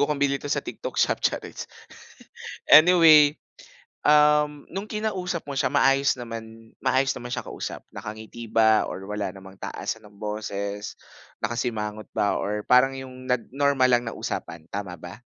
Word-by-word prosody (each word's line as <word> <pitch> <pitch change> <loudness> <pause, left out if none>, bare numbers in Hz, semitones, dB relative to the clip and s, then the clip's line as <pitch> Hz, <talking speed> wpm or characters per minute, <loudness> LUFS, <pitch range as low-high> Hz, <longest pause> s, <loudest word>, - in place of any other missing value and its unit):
Bago 145 - +4
kong 150 - 0
bili 140 -1 +1
ito 145 - -6
sa - - -1
TikTok - - -7
shop, - - +2
chariz! - - -3 1.0
Anyway, 155 -3 +8 0.7
um, 150 0 +4
nung 200 +3 -5
kinausap 190 -6 -3
mo 140 - -6
siya 135 - +1
maayos 135 -1 +3
naman 115 -1 -9
maayos 135 +1 +2
naman 120 - -8
siyang 125 - -4
kausap? - - -6
Nakangiti 110 +2 -8
ba 110 -1 +4
or 95 - -7
wala 105 -1 -3
namang 95 0 -13
taasan 110 - -4
ng 100 - -22
boses? 105 -1 -5 0.5
Nakasimangot 110 -2 -3
ba 100 - 0
or 105 +1 -3
parang 135 +2 +4
yung 130 -1 -9
nag 125 -1 -1
normal 140 -2 +3
lang 120 - +3
na - - -9
usapan, 80 -1 -5
tama 100 -3 -5
ba? 90 +2 -9
125 Hz, 155 wpm, -25 LUFS, 105-145 Hz, 1.0 s, Anyway